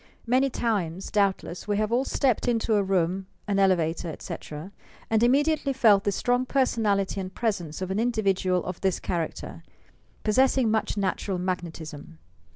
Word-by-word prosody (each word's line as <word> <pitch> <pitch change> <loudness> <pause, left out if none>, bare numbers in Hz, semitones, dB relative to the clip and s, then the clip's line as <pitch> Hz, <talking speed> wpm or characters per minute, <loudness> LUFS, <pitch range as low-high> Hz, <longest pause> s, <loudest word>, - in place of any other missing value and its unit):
Many 255 +3 +3
times, 195 -8 -2
doubtless, 195 -3 0
we 205 -1 +1
have 215 +1 0
all 250 +3 +2
stepped 255 -5 +1
into 230 -2 +1
a 205 - +4
room, 190 0 0 0.2
an 200 -1 +1
elevator, 175 -3 +2
etc., 155 +2 -7 0.4
and 220 -1 +3
immediately 280 +3 +2
felt 215 -6 +4
the 200 - +2
strong 245 +5 +1
personality 215 -7 +1
and 185 0 -6
presence 190 -7 -2
of 185 - -4
an 195 - 0
individual 195 -6 +1
of 180 -1 -5
this 190 -2 +1
character, 170 -3 -4 0.6
possessing 255 +1 +3
much 220 -1 0
natural 195 -1 -1
magnetism. 165 -4 -5
200 Hz, 150 wpm, -26 LUFS, 185-235 Hz, 0.6 s, a